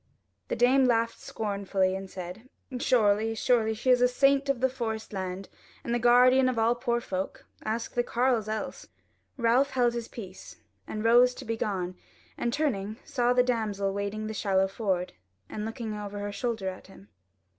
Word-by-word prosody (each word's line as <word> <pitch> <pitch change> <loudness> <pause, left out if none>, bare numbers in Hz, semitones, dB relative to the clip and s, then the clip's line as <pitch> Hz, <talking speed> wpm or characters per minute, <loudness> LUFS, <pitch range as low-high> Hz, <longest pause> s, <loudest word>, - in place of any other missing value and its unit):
The - - -2
dame 260 +2 +4
laughed 230 -2 +1
scornfully 200 -3 -1
and 190 0 -6
said: 185 +7 -8 0.3
"Surely, 220 -2 +2
surely; 220 -2 +2
she 255 +4 +1
is 250 - +5
the 250 - +5
saint 275 +2 +2
of 275 -3 +1
the 260 - +3
Forest 225 -4 -4
Land, 190 0 -4 0.4
and 235 - -2
the 240 - +1
guardian 250 +2 +5
of 250 - -2
all 225 +1 +3
poor 240 -1 -1
folk. 190 -4 -5 0.2
Ask 225 +2 -3
the 240 - +2
carles 240 -2 +1
else!" 220 0 -4 0.5
Ralph 245 +3 +3
held 245 -3 +2
his 235 -1 -4
peace, 190 -5 -10 0.3
and 215 0 -4
rose 245 +2 +5
to 265 - -9
be 230 0 -2
gone 185 -5 -2 0.4
and 240 - -1
turning 220 -8 -1
saw 245 -5 +1
the 250 0 +4
damsel 210 -5 -1
wading 200 +2 -3
the 220 - -4
shallow 195 -2 +1
ford, 190 -3 -2 0.3
and 210 - -5
looking 225 -1 -5
over 205 -1 -6
her 205 0 -4
shoulder 220 -2 -3
at 185 0 -6
him. 105 - -16
225 Hz, 175 wpm, -28 LUFS, 200-245 Hz, 0.5 s, is